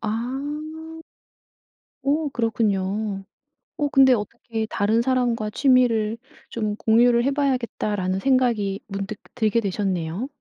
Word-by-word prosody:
아. 295 +8 -4 1.0
오 295 +2 +1
그렇군요. 210 -4 -1 0.5
어 295 - +1
근데 265 -2 +6
어떻게 220 0 -3
'다른 215 +3 +1
사람과 240 -4 0
취미를 230 -3 +3 0.3
좀 215 -2 -2
공유를 235 +2 +4
해 275 - +1
봐야겠다.'라는 235 -9 -1
생각이 230 -6 +1
문득 200 +1 -5 0.2
들게 230 -1 +2
되셨네요. 190 0 -2
230 Hz, 240 characters per minute, -23 LUFS, 210-260 Hz, 1.0 s, 근데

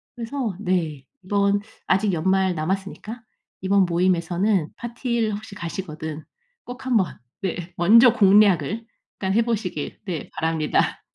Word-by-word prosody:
그래서 235 -3 -3
네. 165 -8 -1 0.2
이번 200 +1 +2 0.3
아직 195 +2 +2
연말 190 +2 +2
남았으니까 195 +7 -4 0.4
이번 195 0 +3
모임에서는 175 +1 +1
파티를 235 -2 -2
혹시 210 -1 -9
가시거든 160 -4 -6 0.4
꼭 245 +1 -9
한번 225 -8 +1 0.2
네, 175 -2 -4
먼저 230 +8 +7
공략을 205 - +4 0.3
일단 190 -1 -2
해보시길 215 -8 -1
네, 175 -5 -4
바랍니다. 160 -1 0
190 Hz, 275 characters per minute, -23 LUFS, 170-220 Hz, 0.4 s, 먼저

